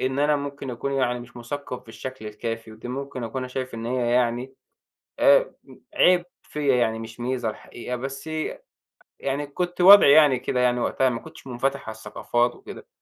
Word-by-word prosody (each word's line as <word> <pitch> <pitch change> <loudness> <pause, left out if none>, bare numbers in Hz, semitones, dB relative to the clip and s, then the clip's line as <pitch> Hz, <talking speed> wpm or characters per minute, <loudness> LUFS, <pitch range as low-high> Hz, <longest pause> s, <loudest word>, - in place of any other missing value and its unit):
إن 130 +1 -1
أنا 150 0 +3
ممكن 140 -2 -5
أكون 140 +3 -3
يعني 125 -2 0
مش 120 0 -13
مُثَقَّف 125 +2 -6
بالشكل 115 +1 -8
الكافي، 115 +1 -5
ودي 110 +3 -9
ممكن 135 -1 -5
أكون 115 +3 -4
أنا 130 - -5
شايف 130 -1 -5
إن 115 0 -5
هي 120 -1 0
يعني 125 +2 0 0.7
آآ - - +5
امم - - -16
عيب 180 -1 +5 0.2
فيَّ 150 -1 -5
يعني 110 -2 +1
مش 115 +1 -9
ميزة 125 -1 -1
الحقيقة، 120 +3 -7
بس 135 +4 -6
ي 155 0 -2
أ - - -18 0.6
يعني 140 +2 -2
كُنت 175 +5 -3
وضعي 195 -5 +9
يعني 145 -4 +6
كده 125 0 -2
يعني 125 0 +2
وقتها، 130 +2 +1
ما 115 -2 -3
كُنتش 160 -3 -13
مُنفَتَح 135 +2 -2
على 110 - -6
الثقافات 120 +2 -1
وكده. - - -11
130 Hz, 190 wpm, -24 LUFS, 120-140 Hz, 0.7 s, وضعي